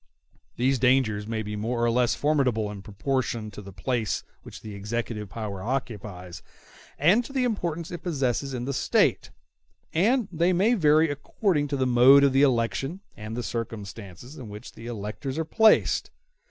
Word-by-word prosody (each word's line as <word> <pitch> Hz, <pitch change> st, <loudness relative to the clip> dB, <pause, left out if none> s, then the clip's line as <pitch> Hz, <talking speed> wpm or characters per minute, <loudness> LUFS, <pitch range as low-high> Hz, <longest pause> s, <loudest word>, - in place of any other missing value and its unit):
These 130 Hz, +2 st, +1 dB
dangers 120 Hz, -5 st, +2 dB
may 110 Hz, -1 st, -2 dB
be 105 Hz, 0 st, -5 dB
more 115 Hz, +3 st, -1 dB
or 120 Hz, -, +2 dB
less 120 Hz, 0 st, +2 dB
formidable 130 Hz, -8 st, +1 dB
in 100 Hz, -2 st, -8 dB
proportion 110 Hz, +1 st, -2 dB
to 105 Hz, -, -9 dB
the 100 Hz, -1 st, -11 dB
place 110 Hz, +4 st, -2 dB, 0.2 s
which -, -, -11 dB
the 110 Hz, -, -8 dB
executive 105 Hz, 0 st, -4 dB
power 100 Hz, -2 st, -5 dB
occupies, 100 Hz, -7 st, -5 dB, 0.6 s
and 185 Hz, -, +4 dB
to 255 Hz, -, -10 dB
the 265 Hz, -2 st, 0 dB
importance 170 Hz, -8 st, -2 dB
it 175 Hz, -3 st, -6 dB
possesses 135 Hz, -5 st, -1 dB
in 120 Hz, 0 st, -4 dB
the 140 Hz, -, -2 dB
State; -, -, +1 dB, 0.6 s
and 220 Hz, +7 st, +2 dB
they 170 Hz, +2 st, +2 dB
may 200 Hz, +7 st, +3 dB
vary 155 Hz, -5 st, +4 dB
according 145 Hz, +1 st, -1 dB
to 140 Hz, 0 st, -2 dB
the 130 Hz, -, +1 dB
mode 130 Hz, +3 st, +7 dB
of 135 Hz, -1 st, +3 dB
election 135 Hz, +5 st, +1 dB
and 110 Hz, +2 st, -7 dB
the 125 Hz, -, -3 dB
circumstances 110 Hz, -, -7 dB
in 120 Hz, -5 st, -8 dB
which 105 Hz, +1 st, -9 dB
the 115 Hz, -, -10 dB
electors 115 Hz, +5 st, -5 dB
are 160 Hz, -, -1 dB
placed. 220 Hz, +6 st, +3 dB
125 Hz, 165 wpm, -26 LUFS, 110-150 Hz, 0.6 s, mode